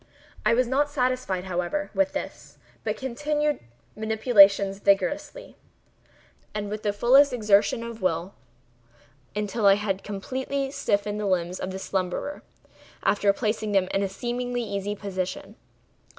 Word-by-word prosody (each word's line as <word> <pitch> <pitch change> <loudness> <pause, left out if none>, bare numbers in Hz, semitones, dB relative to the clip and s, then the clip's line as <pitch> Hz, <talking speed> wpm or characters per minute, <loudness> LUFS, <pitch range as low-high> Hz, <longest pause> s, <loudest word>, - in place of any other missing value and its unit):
I 215 +2 +4
was 255 +1 +3
not 275 +4 +1
satisfied, 255 -9 -1
however, 185 +11 -2
with 290 0 +1
this, - - -7 0.3
but - - -2
continued 295 +3 -1 0.3
the - - -16
manipulations 205 -3 +5
vigorously, 295 - 0 1.0
and 205 -1 -3
with 215 0 -4
the 210 - 0
fullest 255 +7 +5
exertion 215 0 +3
of 235 -1 -7
the - - -12
will, 175 +2 -1 1.0
until 210 +1 0
I 195 - +7
had 200 -2 -2
completely 265 +7 -3
stiffened 210 -7 -1
the 210 - -1
limbs 180 -1 0
of - - -4
the 190 - -5
slumberer, 190 +9 -3 0.6
after 205 -1 +3
placing 215 0 -2
them 190 -2 +3
in 195 - +1
a 195 - 0
seemingly 245 +3 -3
easy 205 -1 -3
position. 195 0 -5
210 Hz, 140 wpm, -26 LUFS, 195-255 Hz, 1.0 s, I